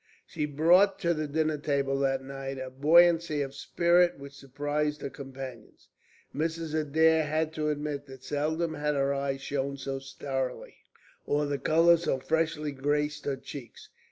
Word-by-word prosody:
She 150 Hz, -2 st, -3 dB
brought 175 Hz, +7 st, +4 dB
to 170 Hz, -3 st, +2 dB
the 155 Hz, -1 st, -3 dB
dinner 155 Hz, 0 st, 0 dB
table 140 Hz, -2 st, 0 dB
that 135 Hz, -1 st, 0 dB
night 135 Hz, 0 st, -6 dB
a 130 Hz, 0 st, -6 dB
buoyancy 160 Hz, +2 st, +4 dB
of 135 Hz, -1 st, -7 dB
spirit 175 Hz, +5 st, +2 dB
which 140 Hz, 0 st, -10 dB
surprised 145 Hz, +2 st, -3 dB
her 140 Hz, -, -4 dB
companions. 135 Hz, -5 st, -10 dB, 0.4 s
Mrs. 160 Hz, +1 st, -2 dB
Adair 160 Hz, +1 st, +3 dB
had 155 Hz, +1 st, -1 dB
to 155 Hz, -1 st, -1 dB
admit 145 Hz, -1 st, -3 dB
that 130 Hz, -1 st, -12 dB
seldom 160 Hz, +4 st, -1 dB
had 150 Hz, -1 st, -1 dB
her 140 Hz, 0 st, +1 dB
eyes 140 Hz, -1 st, -2 dB
shone 140 Hz, 0 st, -2 dB
so 135 Hz, 0 st, -4 dB
starrily, 135 Hz, -1 st, -5 dB, 0.5 s
or 145 Hz, +1 st, +1 dB
the 145 Hz, -1 st, -2 dB
colour 170 Hz, +2 st, +5 dB
so 165 Hz, -5 st, -1 dB
freshly 155 Hz, +1 st, -1 dB
graced 145 Hz, +2 st, -1 dB
her 140 Hz, -2 st, -1 dB
cheeks. 125 Hz, -4 st, -10 dB
145 Hz, 155 wpm, -29 LUFS, 135-160 Hz, 0.5 s, colour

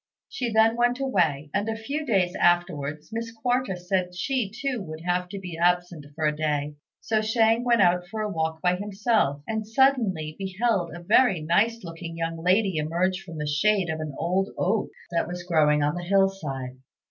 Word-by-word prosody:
She 245 Hz, -3 st, -3 dB
then 220 Hz, +1 st, +4 dB
went 240 Hz, +1 st, +2 dB
away; 155 Hz, -, 0 dB
and 205 Hz, +3 st, 0 dB
a 220 Hz, -, -1 dB
few 280 Hz, +7 st, -4 dB
days 190 Hz, -6 st, +1 dB
afterwards 155 Hz, -4 st, +1 dB
Miss 230 Hz, +1 st, -4 dB
Quarta 245 Hz, -3 st, -1 dB
said 180 Hz, 0 st, -2 dB
she 240 Hz, +3 st, -1 dB
too 250 Hz, +2 st, -3 dB
would 155 Hz, -3 st, -8 dB
have 180 Hz, +1 st, -1 dB
to 200 Hz, -, -6 dB
be 180 Hz, -3 st, -7 dB
absent 175 Hz, -3 st, +1 dB
for 160 Hz, -, -1 dB
a 150 Hz, 0 st, +1 dB
day, 150 Hz, -1 st, -1 dB, 0.3 s
so 220 Hz, -1 st, 0 dB
Shang 225 Hz, +1 st, +2 dB
went 235 Hz, -4 st, +4 dB
out 180 Hz, 0 st, +2 dB
for 215 Hz, +3 st, -5 dB
a 215 Hz, -, -1 dB
walk 160 Hz, -1 st, -2 dB
by 180 Hz, 0 st, +2 dB
himself, 200 Hz, -, 0 dB
and 220 Hz, -1 st, -3 dB
suddenly 220 Hz, -, +2 dB
beheld 195 Hz, -1 st, 0 dB
a 175 Hz, -, -9 dB
very 200 Hz, -2 st, +4 dB
nice 210 Hz, +9 st, +1 dB
looking 165 Hz, -1 st, -7 dB
young 165 Hz, 0 st, -3 dB
lady 190 Hz, 0 st, +2 dB
emerge 175 Hz, +5 st, 0 dB
from 170 Hz, -2 st, -10 dB
the 150 Hz, -, -3 dB
shade 185 Hz, +5 st, +2 dB
of 160 Hz, -, -4 dB
an 155 Hz, -3 st, -5 dB
old 185 Hz, +4 st, 0 dB
oak 210 Hz, +4 st, 0 dB, 0.2 s
that 170 Hz, -1 st, 0 dB
was 175 Hz, 0 st, -6 dB
growing 150 Hz, -4 st, +3 dB
on 145 Hz, +1 st, +1 dB
the 175 Hz, -, -4 dB
hill 195 Hz, +2 st, +3 dB
side. 135 Hz, -9 st, -6 dB
180 Hz, 195 wpm, -25 LUFS, 165-220 Hz, 0.3 s, then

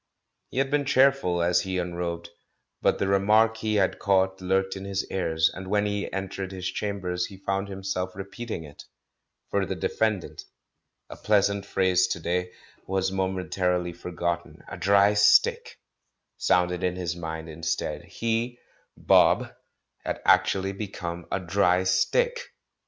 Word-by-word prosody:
He -, -, -9 dB
had 135 Hz, 0 st, +1 dB
been 145 Hz, -1 st, +1 dB
cheerful 130 Hz, -11 st, +3 dB
as 85 Hz, 0 st, +3 dB
he 95 Hz, -1 st, -3 dB
unrobed, 85 Hz, -1 st, -4 dB, 0.5 s
but -, -, +2 dB
the 100 Hz, -, -1 dB
re 100 Hz, 0 st, +3 dB
mark 110 Hz, +3 st, +3 dB
he 110 Hz, -1 st, -1 dB
had 95 Hz, -2 st, +1 dB
caught 95 Hz, -1 st, +1 dB
lurked 95 Hz, +1 st, 0 dB
in 95 Hz, -, -7 dB
his 100 Hz, -1 st, -2 dB
ears, 80 Hz, -3 st, +1 dB
and 95 Hz, 0 st, -8 dB
when 105 Hz, +1 st, +1 dB
he 100 Hz, -1 st, -2 dB
entered 95 Hz, 0 st, -4 dB
his 95 Hz, -1 st, -7 dB
chambers 90 Hz, -4 st, -2 dB
he 95 Hz, -, -12 dB
found 95 Hz, +1 st, -1 dB
himself 95 Hz, -1 st, -4 dB
repeat 100 Hz, +5 st, -8 dB
ing 85 Hz, -, -4 dB
it. 75 Hz, -2 st, -12 dB, 0.7 s
"For -, -, +1 dB
the -, -, -3 dB
defendant," 110 Hz, -5 st, -1 dB, 0.6 s
a -, -, -9 dB
pleasant 100 Hz, -1 st, +1 dB
phrase 95 Hz, -1 st, +2 dB
to -, -, -3 dB
day, 90 Hz, +2 st, -2 dB, 0.4 s
was 95 Hz, 0 st, 0 dB
momentarily 90 Hz, -2 st, -1 dB
forgotten; 85 Hz, 0 st, -4 dB
"a -, -, -7 dB
dry 100 Hz, +1 st, +4 dB
stick" 105 Hz, 0 st, +4 dB, 0.6 s
sounded 90 Hz, 0 st, +1 dB
in 90 Hz, -1 st, 0 dB
his 90 Hz, -2 st, -3 dB
mind 80 Hz, -1 st, -6 dB
instead. 80 Hz, +1 st, -3 dB
He, 115 Hz, +2 st, -2 dB, 0.4 s
*'Bob," -, -, +4 dB, 0.5 s
had -, -, -3 dB
actually 95 Hz, 0 st, +3 dB
become 90 Hz, -4 st, -6 dB
a 95 Hz, -, 0 dB
"dry 90 Hz, 0 st, +2 dB
stick"! 475 Hz, -, 0 dB
95 Hz, 150 wpm, -26 LUFS, 90-100 Hz, 0.7 s, dry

